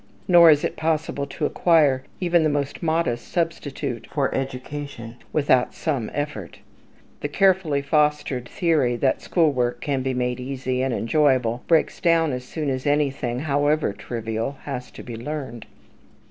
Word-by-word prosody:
Nor 170 Hz, -2 st, +8 dB
is 150 Hz, 0 st, +5 dB
it 170 Hz, -, -2 dB
possible 155 Hz, -3 st, -1 dB
to 150 Hz, +2 st, -3 dB
acquire 150 Hz, -6 st, +3 dB, 0.2 s
even 175 Hz, -2 st, +3 dB
the 155 Hz, -, +2 dB
most 145 Hz, -1 st, -2 dB
modest 160 Hz, -8 st, 0 dB
substitute 145 Hz, -7 st, -3 dB
for 140 Hz, -3 st, 0 dB
education 135 Hz, -2 st, -5 dB
without 135 Hz, -4 st, +2 dB
some 135 Hz, -9 st, -2 dB
effort. 110 Hz, -, -5 dB, 0.6 s
The -, -, -2 dB
carefully 180 Hz, -4 st, +2 dB
fostered 150 Hz, -4 st, +1 dB
theory 155 Hz, -9 st, +1 dB
that 130 Hz, +2 st, +1 dB
school 165 Hz, -4 st, +2 dB
work 120 Hz, -2 st, -1 dB
can 140 Hz, -1 st, -1 dB
be 130 Hz, 0 st, -2 dB
made 125 Hz, 0 st, -1 dB
easy 130 Hz, 0 st, -3 dB
and 130 Hz, 0 st, 0 dB
enjoyable 125 Hz, -1 st, +1 dB
breaks 165 Hz, -2 st, +2 dB
down 165 Hz, -3 st, +3 dB
as 125 Hz, 0 st, -4 dB
soon 150 Hz, +2 st, -3 dB
as 130 Hz, +1 st, -3 dB
anything, 135 Hz, -4 st, 0 dB
however 145 Hz, -3 st, +1 dB
trivial, 115 Hz, +4 st, -4 dB
has 125 Hz, -3 st, -5 dB
to -, -, -11 dB
be 120 Hz, -, -7 dB
learned. 125 Hz, -2 st, -6 dB
140 Hz, 150 wpm, -23 LUFS, 125-155 Hz, 0.6 s, Nor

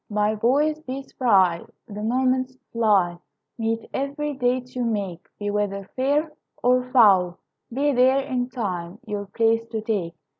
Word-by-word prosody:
My 210 Hz, 0 st, +1 dB
boys, 285 Hz, +8 st, +2 dB
be 270 Hz, -1 st, -5 dB
spry, 190 Hz, -11 st, +2 dB, 0.2 s
The 210 Hz, -1 st, -7 dB
moments 255 Hz, +3 st, 0 dB
fly; 200 Hz, -7 st, +2 dB, 0.4 s
Meet 225 Hz, 0 st, -1 dB
every 285 Hz, +2 st, -2 dB
date 250 Hz, -1 st, -1 dB
you 250 Hz, -, -1 dB
make. 200 Hz, -7 st, -3 dB
Be 205 Hz, 0 st, -3 dB
weather 200 Hz, -1 st, -2 dB
fair 290 Hz, +4 st, +1 dB, 0.3 s
Or 250 Hz, +1 st, +4 dB
foul, 195 Hz, -8 st, +5 dB, 0.3 s
be 285 Hz, +4 st, +1 dB
there 260 Hz, +2 st, +4 dB
In 255 Hz, -2 st, -2 dB
time 190 Hz, -7 st, -4 dB
your 205 Hz, -2 st, -4 dB
place 225 Hz, +3 st, +2 dB
to 225 Hz, -1 st, -3 dB
take. 200 Hz, -7 st, -2 dB
230 Hz, 145 wpm, -24 LUFS, 205-260 Hz, 0.4 s, foul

